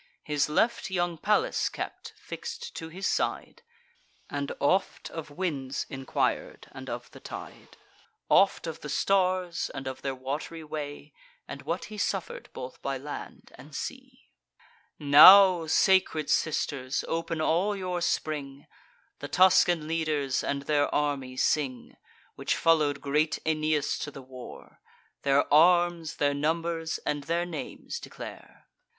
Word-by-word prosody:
His 150 -1 0
left 230 +9 +1
young 175 -3 -1
Pallas 210 +5 +1
kept, - - -7
fix'd 475 0 -7
to 160 -1 -6
his 185 +4 -6
side, 475 - -1 0.7
And 140 -1 -3
oft 185 +7 0
of 160 -2 -7
winds 145 -5 -3
enquir'd, 135 -1 -2
and - - -9
of - - -6
the - - -13
tide; - - -10 0.5
Oft 195 -2 +4
of 165 -2 -5
the 150 - -8
stars, 185 +2 +1
and 135 - -6
of 130 -1 -5
their 135 -1 -3
wat'ry 145 +5 -5
way; 150 -1 -7 0.3
And - - -7
what - - -3
he 210 - -7
suffer'd 195 -2 -3
both 130 0 -8
by 135 -1 -2
land 145 +3 -8
and - - -12
sea. - - -8 0.7
Now, 170 +4 +8
sacred 160 -3 +3
sisters, 135 -4 0
open 165 0 -2
all 180 +6 +1
your 180 -2 -3
spring! 145 -4 -2 0.5
The - - -5
Tuscan 180 -4 +4
leaders, 155 -4 0
and 140 0 -2
their 145 0 +2
army 140 -3 -1
sing, 130 -3 0 0.4
Which - - -1
follow'd 150 -4 +2
great 150 +2 +1
Aeneas 155 -1 0
to - - -4
the 135 -2 -10
war: 130 -1 -12 0.4
Their 140 0 +3
arms, 175 0 +4
their 145 -1 +1
numbers, 165 +2 -1
and 145 -1 -2
their 170 +1 0
names 175 - -6
declare. - - -11
155 Hz, 135 wpm, -28 LUFS, 140-175 Hz, 0.7 s, Now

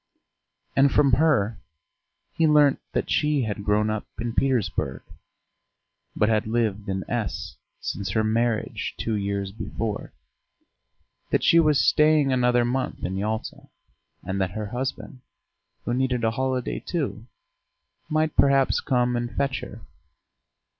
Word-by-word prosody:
And 135 0 +5
from 140 -2 +4
her 120 -6 +2 0.7
he 165 - +2
learnt 150 -2 +5
that - - -1
she 150 -3 +2
had 105 -2 -4
grown 105 +1 +2
up 110 -1 -4
in 115 0 -3
Petersburg, 125 -8 0 1.1
but 105 - +2
had 110 -1 +1
lived 110 -3 -1
in 95 0 -2
S 110 -10 -3 0.2
since 100 0 -4
her 110 +3 +1
marriage 115 +1 -1
two 115 - -2
years 100 -1 -2
before, 110 0 -4 1.2
that - - +1
she 170 - +6
was 150 -3 +4
staying 150 -3 +4
another 125 -1 +3
month 130 +2 -2
in 95 +1 -3
Yalta, 110 +3 -4 0.6
and 95 +1 -2
that 90 -1 -1
her 105 - -3
husband, 125 +3 -5 0.6
who 120 - -1
needed 125 -1 0
a 110 - +2
holiday 130 0 -2
too, 115 - -4 0.8
might 155 0 0
perhaps 140 -1 +4
come 125 -1 +1
and 120 0 -2
fetch 140 -2 0
her. - - -9
120 Hz, 135 wpm, -25 LUFS, 105-135 Hz, 1.2 s, she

